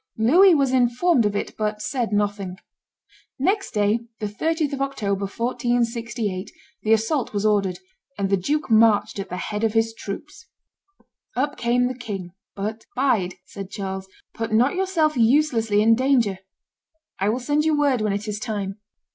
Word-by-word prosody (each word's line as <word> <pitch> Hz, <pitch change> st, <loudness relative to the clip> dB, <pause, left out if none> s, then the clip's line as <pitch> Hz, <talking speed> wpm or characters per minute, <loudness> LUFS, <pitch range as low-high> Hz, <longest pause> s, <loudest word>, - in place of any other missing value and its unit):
Louis 335 Hz, -, +6 dB
was 275 Hz, -3 st, +2 dB
informed 250 Hz, +1 st, +3 dB
of 205 Hz, -, -3 dB
it, -, -, -3 dB
but 210 Hz, -1 st, -1 dB
said 240 Hz, +1 st, -2 dB
nothing. 205 Hz, -3 st, -1 dB, 0.8 s
Next 390 Hz, +9 st, 0 dB
day, 210 Hz, 0 st, +1 dB, 0.2 s
the 215 Hz, -, -3 dB
30th 305 Hz, +8 st, -1 dB
of 275 Hz, -, -3 dB
October, 200 Hz, -8 st, -1 dB
1468, 235 Hz, -3 st, -2 dB, 0.3 s
the 220 Hz, -, 0 dB
assault 225 Hz, +5 st, +1 dB
was 205 Hz, 0 st, -1 dB
ordered; 200 Hz, -4 st, +2 dB, 0.4 s
and 200 Hz, -1 st, -1 dB
the -, -, +5 dB
duke 285 Hz, +10 st, -1 dB
marched 220 Hz, -2 st, +4 dB
at 195 Hz, -1 st, -5 dB
the 180 Hz, -, -4 dB
head 210 Hz, +3 st, -3 dB
of 220 Hz, -1 st, +2 dB
his 225 Hz, 0 st, +1 dB
troops. 225 Hz, +8 st, -8 dB, 0.9 s
Up 285 Hz, +4 st, 0 dB
came 245 Hz, +1 st, +1 dB
the 255 Hz, -, -3 dB
king; 200 Hz, -7 st, -6 dB, 0.2 s
but, 215 Hz, +3 st, -5 dB
"Bide," 230 Hz, -9 st, +1 dB
said 195 Hz, -1 st, -8 dB
Charles; 190 Hz, -1 st, -5 dB, 0.3 s
"put 225 Hz, -1 st, -4 dB
not 240 Hz, +5 st, +3 dB
yourself 360 Hz, -5 st, +1 dB
uselessly 230 Hz, -4 st, +3 dB
in 225 Hz, +1 st, +6 dB
danger; 240 Hz, -6 st, +2 dB, 0.8 s
I 195 Hz, +2 st, +1 dB
will 225 Hz, -, +1 dB
send 290 Hz, +4 st, +1 dB
you 310 Hz, -1 st, +2 dB
word 280 Hz, -5 st, +2 dB
when 215 Hz, -1 st, +1 dB
it 205 Hz, +2 st, -3 dB
is 210 Hz, 0 st, -3 dB
time." 205 Hz, -3 st, -4 dB
225 Hz, 165 wpm, -23 LUFS, 205-265 Hz, 0.9 s, Louis